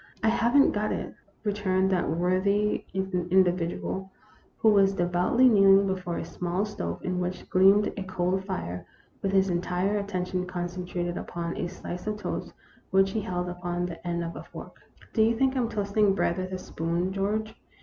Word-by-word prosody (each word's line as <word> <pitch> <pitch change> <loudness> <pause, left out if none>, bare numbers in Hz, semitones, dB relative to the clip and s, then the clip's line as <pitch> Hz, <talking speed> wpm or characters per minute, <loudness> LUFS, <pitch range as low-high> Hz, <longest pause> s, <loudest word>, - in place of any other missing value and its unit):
"I 220 - +4
haven't 240 +5 +4
got 210 0 -1
it," - - -4 0.3
returned 195 -2 +1
that 180 -5 +1
worthy 185 +5 +1
indi 185 -1 +2
vidual, 180 +2 -4 0.5
who 220 - +4
was 195 -2 +4
devoutly 180 +8 +3
kneeling 195 -3 +6
before 185 -3 -2
a - - -4
small 180 +3 -2
stove, 85 - -5
in 180 0 -1
which 180 0 -4
gleamed 195 +2 +5
a - - -5
coal 185 0 -1
fire, 180 - -5 0.4
with 195 - 0
his 190 -1 +3
entire 180 +4 0
attention 185 -2 -3
concentrated 175 -1 -3
upon 170 0 -4
a 175 - -2
slice 180 +1 -7
of 210 0 -1
toast 210 - -4 0.4
which 195 0 +3
he 220 - -1
held 180 -3 -3
upon 175 0 -3
the 175 0 -7
end 170 0 -1
of 170 0 -5
a - - -6
fork. - - -11 0.2
" - - -23
Do 220 - +2
you 225 +1 +4
think 265 +2 +2
I'm 245 -3 0
toasting 205 -2 +1
bread 170 -2 0
with 185 0 -4
a 185 - -2
spoon, 175 +1 -2
George? 215 +3 -1
185 Hz, 180 wpm, -27 LUFS, 180-200 Hz, 0.5 s, kneeling